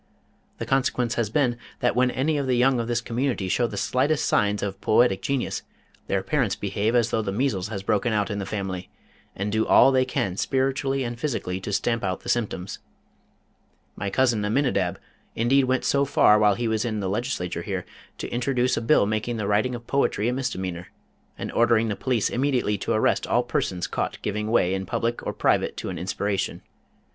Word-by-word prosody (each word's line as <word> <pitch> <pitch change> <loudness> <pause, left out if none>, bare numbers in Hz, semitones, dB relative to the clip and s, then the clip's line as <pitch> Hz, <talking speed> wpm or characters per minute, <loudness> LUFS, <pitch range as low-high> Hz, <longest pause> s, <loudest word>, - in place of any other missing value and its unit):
The - - -4
consequence 125 -3 +1
has 115 -4 -1
been 120 -1 +1 0.2
that 125 - +1
when 125 0 +3
any 145 +5 0
of 140 - -2
the 125 -1 +2
young 125 0 +3
of 115 - -2
this 120 0 0
community 120 -4 -1
show 120 +6 +1
the 105 - -7
slightest 135 +8 +1
signs 105 -1 +1
of 100 -1 -4
poetic 110 -3 +3
genius 140 -2 -2 0.5
their 95 -1 0
parents 130 -10 0
behave 105 +3 -1
as 120 -1 +2
though 110 - +1
the 100 -2 -3
measles 105 -4 -1
had 100 -3 -6
broken 105 +4 +1
out 105 0 0
in 100 - -3
the 100 - -3
family, 95 -3 -4 0.5
and 100 +2 -2
do 110 +1 +2
all 135 - +7
they 130 -1 +3
can 100 -7 -2
spiritually 135 +1 0
and 120 -1 -5
physically 115 -10 -2
to 95 - -5
stamp 115 +3 0
out 95 -1 -2
the - - -7
symptoms. 100 -5 -2 1.2
My 100 - -3
cousin 120 -1 +2
Aminidab 105 -5 +1 0.4
indeed 130 +4 +3
went 130 0 0
so 140 0 +3
far 105 -6 +5
while 105 -2 +4
he 120 -1 -2
was 110 -1 0
in 110 -3 -2
the 100 - -2
Legislature 95 -5 -2
here, 95 0 -4 0.3
to - - -5
introduce 125 +1 +1
a - - -2
bill 115 -1 +4
making 110 +3 -2
the 105 - -2
writing 105 +5 +1
of 120 -1 -9
poetry 130 -6 +1
a 125 - +1
misdemeanor, 95 -9 -3 0.5
and - - -5
ordering 115 -1 +3
the 105 - -1
police 125 -3 0
immediately 125 -5 +1
to - - -3
arrest - - +1
all - - +2
persons 90 -1 -1
caught - - -3
giving 105 +1 -2
way 95 -5 +3
in 95 0 -3
public 120 0 -2
or - - 0
private - - +1
to - - -4
an - - -5
inspiration. 100 +2 -2
115 Hz, 200 wpm, -25 LUFS, 100-125 Hz, 1.2 s, all